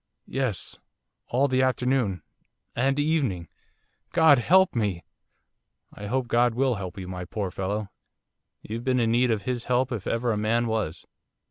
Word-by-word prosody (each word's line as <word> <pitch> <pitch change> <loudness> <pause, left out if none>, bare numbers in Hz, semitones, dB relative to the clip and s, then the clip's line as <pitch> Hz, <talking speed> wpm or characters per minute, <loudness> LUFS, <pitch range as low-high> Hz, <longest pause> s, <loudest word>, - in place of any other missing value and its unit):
'Yes 130 -7 -3 0.5
all 135 +4 +2
the 130 -1 +2
afternoon 125 -6 +1 0.5
and 135 +3 +1
evening 145 - 0 0.7
God 160 -5 +6
help 190 +9 +4
me!' 100 -7 -1 0.9
'I 105 - -8
hope 130 +2 -1
God 120 0 +2
will 130 0 +2
help 100 -2 -6
you 95 -2 -6
my 90 -1 -5
poor 100 0 -4
fellow; 100 +3 -3 0.8
you've 115 +2 -5
been 130 0 +1
in 115 -1 +2
need 120 +2 +3
of 110 -3 0
His 125 -1 -3
help 125 +1 +1
if 110 -5 -4
ever 115 -1 0
man 110 +3 +1
was. 110 -8 -2
120 Hz, 150 wpm, -26 LUFS, 105-130 Hz, 0.9 s, God